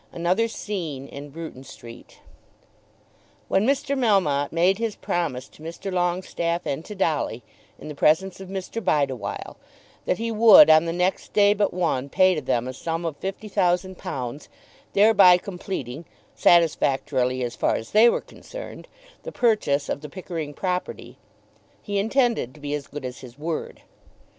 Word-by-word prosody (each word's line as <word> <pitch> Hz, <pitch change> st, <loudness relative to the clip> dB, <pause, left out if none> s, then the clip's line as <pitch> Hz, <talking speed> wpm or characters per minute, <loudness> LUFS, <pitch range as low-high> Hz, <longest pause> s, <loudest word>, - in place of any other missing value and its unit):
ANOTHER 180 Hz, +7 st, +1 dB
SCENE 165 Hz, -12 st, -5 dB
IN 145 Hz, +1 st, -9 dB
BRUTON 155 Hz, -3 st, -9 dB
STREET. 115 Hz, -3 st, -13 dB, 1.3 s
When 195 Hz, +4 st, +2 dB
Mr. 280 Hz, +1 st, 0 dB
Melmotte 190 Hz, -, +2 dB
made 180 Hz, +4 st, +2 dB
his 230 Hz, -2 st, -2 dB
promise 140 Hz, -7 st, -3 dB
to -, -, -19 dB
Mr. 170 Hz, +4 st, -6 dB
Longestaffe 175 Hz, -1 st, -1 dB
and 140 Hz, +3 st, -3 dB
to 210 Hz, -, -8 dB
Dolly, 150 Hz, -, -1 dB, 0.3 s
in -, -, -11 dB
the 150 Hz, -, -6 dB
presence 175 Hz, +7 st, +2 dB
of 190 Hz, -1 st, -9 dB
Mr. 195 Hz, +4 st, -5 dB
Bideawhile, 135 Hz, -, -1 dB, 0.5 s
that -, -, 0 dB
he 230 Hz, +1 st, -3 dB
would, 215 Hz, -5 st, +8 dB
on 155 Hz, +1 st, +6 dB
the 165 Hz, -, -1 dB
next 180 Hz, +2 st, -1 dB
day 205 Hz, 0 st, +5 dB
but 205 Hz, 0 st, 0 dB
one, 160 Hz, -7 st, -1 dB
pay 185 Hz, +5 st, +4 dB
to 155 Hz, -, -3 dB
them 125 Hz, -2 st, -1 dB
a 130 Hz, -, -5 dB
sum 165 Hz, +5 st, -4 dB
of 160 Hz, -3 st, -3 dB
fifty 195 Hz, +3 st, -6 dB
thousand 185 Hz, -2 st, 0 dB
pounds, 130 Hz, 0 st, -6 dB, 0.4 s
thereby 200 Hz, -3 st, +6 dB
completing, 175 Hz, -, -6 dB, 0.3 s
satisfactorily 135 Hz, -6 st, +2 dB
as 120 Hz, -1 st, -4 dB
far -, -, +1 dB
as 110 Hz, -, -6 dB
they 220 Hz, +3 st, +6 dB
were -, -, 0 dB
concerned, -, -, -10 dB, 0.3 s
the -, -, -7 dB
purchase 210 Hz, -, +1 dB
of -, -, -3 dB
the 150 Hz, -, -8 dB
Pickering 165 Hz, -4 st, -6 dB
property, 180 Hz, +1 st, -4 dB, 0.6 s
he 205 Hz, -1 st, -3 dB
intended 225 Hz, -, 0 dB
to -, -, -15 dB
be 145 Hz, 0 st, -4 dB
as 145 Hz, -1 st, -4 dB
good 145 Hz, -2 st, -7 dB
as 125 Hz, 0 st, -6 dB
his 125 Hz, -1 st, -12 dB
word. 160 Hz, +2 st, -5 dB
170 Hz, 160 wpm, -24 LUFS, 145-195 Hz, 1.3 s, would